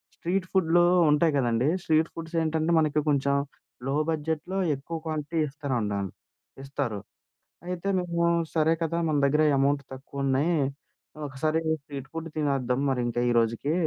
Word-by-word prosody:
Street 185 +2 -1
ఫుడ్లు 175 -1 +4 0.3
ఉంటాయి 150 +1 +3
కదండీ. 120 +2 +2
స్ట్రీట్ 160 +1 +2
ఫుడ్స్ 165 0 -7
ఏంటంటే 160 +1 0
మనకి 155 -1 +2
కొంచెం 140 0 +2 0.5
లో 135 - 0 0.2
బడ్జెట్‌లో 160 +4 -2 0.2
ఎక్కువ 165 +5 -6
క్వాంటిటీ 155 +1 -2
ఇస్తారండన్ 115 -9 -2 0.5
ఇస్తారు. 135 -6 -3 0.7
అయితే 180 +2 -3
మేము, 170 -1 0 0.3
"సరే 160 +1 +4
కదా, 170 +1 -1
మన 150 - +1
దగ్గర 150 +2 +3 0.2
అమౌంట్ 140 +1 +2
తక్కువున్నాయి. 140 +4 0 0.7
ఒకసారి 155 +4 -1 0.2
స్ట్రీట్ 140 -2 -8
ఫుడ్ 165 0 -5
తినేద్దాం 135 -3 0
మరి. 125 -2 0
ఇంకా 120 +1 -1
ఈరోజుకి 115 +6 +1
150 Hz, 130 wpm, -27 LUFS, 135-165 Hz, 0.7 s, ఫుడ్లు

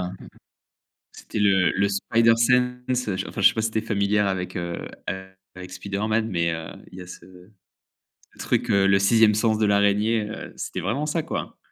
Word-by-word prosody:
hein. 90 0 -4 1.0
C'était - - -7
le 95 -3 +3
le 100 +1 +1
Spider-Sense. 125 +4 +1 0.2
Enfin, - - -6
je 100 - +5
sais - - -3
pas 110 - -1
si 110 - 0
tu 110 - -1
es - - +1
familière 105 -1 +1
avec, 95 -2 -3
heu, 85 -1 -4 0.7
avec 90 0 -10
Spider-Man, 105 +4 -2
mais, 85 -4 0
heu, 80 0 -5 0.2
il 95 - -12
y - - -7
a 90 - -12
ce 90 - -11 1.2
truc, - - -1
le 100 0 +4
6e 110 +2 +4
sens 110 +1 +1
de 110 - +1
l'araignée, 105 +2 +2
heu, 110 - -8
c'était - - -5
vraiment 115 - -2
ça, 155 +1 -1
quoi. - - -5
105 Hz, 175 wpm, -24 LUFS, 95-115 Hz, 1.2 s, je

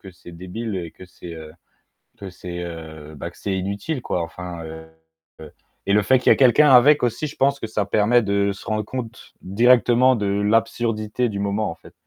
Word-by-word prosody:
que 95 - -11
c'est 90 -1 -14
débile 95 +5 -6
et 85 -2 -5
que 95 - -14
c'est, 90 -1 -11
heu, 80 -1 -10 0.7
que 100 -2 -8
c'est, 90 -1 -7
heu, 80 -2 -9
bah, - - -6
que - - -22
c'est 100 -2 -3
inutile, 100 - -4
quoi, 90 - -2
enfin, 85 0 -7
heu, 80 0 -10 1.0
et 100 - +1
le 105 - +4
fait 130 +6 +3
qu'il 125 - +2
y - - +8
ait - - -6
quelqu'un 140 +3 +5
avec 140 +4 +6
aussi, 125 +5 -1
je - - -9
pense 140 +1 +1
que - - -4
ça 110 -2 -2
permet 110 +4 +3
de 100 -1 0
se 95 - -12
rendre 110 -1 -1
compte, 120 0 -8
directement 120 +4 +4
de 105 -2 -2
l'absurdité 110 +3 0
du 100 - -5
moment, 100 +2 -1
en - - -7
fait. - - -17
100 Hz, 210 wpm, -22 LUFS, 90-120 Hz, 1.0 s, y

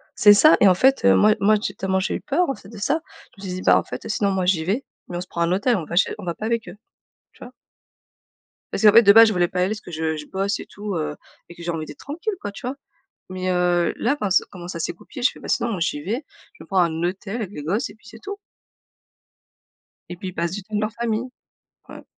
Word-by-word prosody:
C'est 205 -1 +7
ça, 310 +10 +7
et 200 - +7
en 185 - +6
fait, 265 +7 +3
heu, 95 - +6
moi 215 0 +5
moi, 215 +2 +5
j'ai 195 - -3
tellement 190 -1 -1
j'ai 190 - -1
eu - - -5
peur, 300 +3 0
en 270 - -1
fait, 195 - -15
de 225 - -11
ça. 290 +10 0 0.4
Je 200 - -13
me - - -5
suis 180 - -3
dit: - - -7
«Bah, - - +6
en - - 0
fait, - - -8
sinon 205 -2 0
moi 190 -1 0
j'y 175 -4 +2
vais, 225 +9 -1 0.2
mais 175 - -5
on - - -3
se 180 - -8
prend 170 - -5
un 170 +1 +2
hôtel, 205 +6 +2
on 170 -7 -3
va 170 - -6
chez 185 - +3
on 205 - -8
va 170 - -2
pas 215 - -6
avec 230 0 -1
eux». - - -10 0.6
Tu - - -20
vois? 250 - -12 1.2
Parce - - -2
qu'en 210 - +9
fait, 230 +2 +7
de 200 0 +7
base 225 0 +9
je 215 - +1
voulais 175 -1 +2
pas 180 - -4
aller 180 - +3
parce 215 0 -4
que - - -11
je 160 -1 -2
je 150 - -7
bosse 195 +4 -2
et - - -7
tout 205 -2 -6
heu, 150 -2 -2 0.3
et 170 - -12
que 170 - -12
j'ai 170 - -5
envie 160 -2 -3
d'être 145 - -12
tranquille 335 +9 -4
quoi, 205 - -4
tu 205 - -10
vois? 255 - -3 0.6
Mais 185 0 -3
heu, 175 -1 +1
là, 240 - +1
enfin 210 -8 -3
s 190 - +4
comment 175 -2 -9
ça 170 - -5
s'est 165 - -2
goupillé, 245 +8 -11
je 245 - +4
fais: - - -15
«Bah, - - -9
sinon 235 - 0
moi 190 -6 -3
j'y 145 -3 -1
vais, 205 +8 -2 0.4
je - - -24
vais - - -10
me - - -19
prendre 190 -2 +2
un 165 - -4
hôtel 195 +4 -6
avec 215 -6 -4
les 150 - -7
gosses 200 - -1
et 205 - -13
puis 220 0 -23
c'est 225 +2 -12
tout». 400 - -6 1.7
Et 175 - -6
puis 190 0 -5
ils 180 - -11
passent 170 0 -2
du 200 0 -5
temps 215 +1 -7
dans 210 - +1
leur 215 0 -2
famille. 235 +1 -2 0.6
Ouais. - - -10
195 Hz, 295 wpm, -22 LUFS, 175-220 Hz, 1.7 s, qu'en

